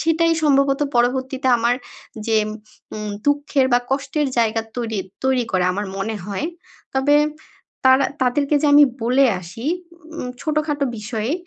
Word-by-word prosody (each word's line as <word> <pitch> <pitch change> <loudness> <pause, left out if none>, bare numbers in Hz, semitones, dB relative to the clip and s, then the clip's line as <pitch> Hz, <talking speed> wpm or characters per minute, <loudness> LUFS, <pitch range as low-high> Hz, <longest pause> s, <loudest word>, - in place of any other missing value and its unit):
সেটাই 330 +1 +2
সম্ভবত 275 -1 +3 0.2
পরবর্তীতে 260 +2 +1
আমার 235 +1 +2 0.5
যেম 215 -2 +2 0.5
উম 215 -1 -4 0.2
দুঃখের 285 -2 +2
বা 245 - +6
কষ্টের 285 +2 0
জায়গা 225 -1 +2
তৈরি 225 -4 -2 0.3
তৈরি 260 -2 +2
করে 185 -1 +2
আমার 205 +2 -3
মনে 215 +3 -3
হয়। 205 +9 -3 0.5
তবে 275 +2 +4 0.7
তারা 260 +1 +6 0.2
তাদেরকে 280 +4 +1
যে - - +3
আমি 290 - +9 0.2
বলে 255 +4 +4 0.2
আসি 210 +8 -8 0.5
উম 250 - -4
ছোটো-খাটো 305 -2 -1
বিষয়ে, 220 +3 -3
260 Hz, 135 wpm, -21 LUFS, 225-285 Hz, 0.7 s, আমি